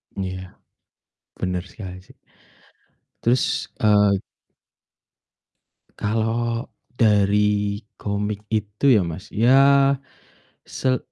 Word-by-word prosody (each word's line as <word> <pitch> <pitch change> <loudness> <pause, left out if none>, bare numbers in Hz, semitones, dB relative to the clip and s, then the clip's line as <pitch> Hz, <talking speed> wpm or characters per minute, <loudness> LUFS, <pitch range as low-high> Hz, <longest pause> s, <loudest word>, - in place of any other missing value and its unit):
Iya, 95 -1 -6 0.9
bener 90 -1 -2
sekali 95 -2 -9
sih. - - -20 1.1
Terus, 120 +2 +1
eee 105 -2 +4 1.8
Kalo 115 +3 -1 0.3
dari 105 -1 +2 0.2
komik 105 0 -3
itu 110 +5 +1
ya, 110 -5 +5
Mas, 85 +3 -8
ya, 135 +4 +5 0.7
se 130 -1 0
105 Hz, 75 wpm, -22 LUFS, 100-115 Hz, 1.8 s, ya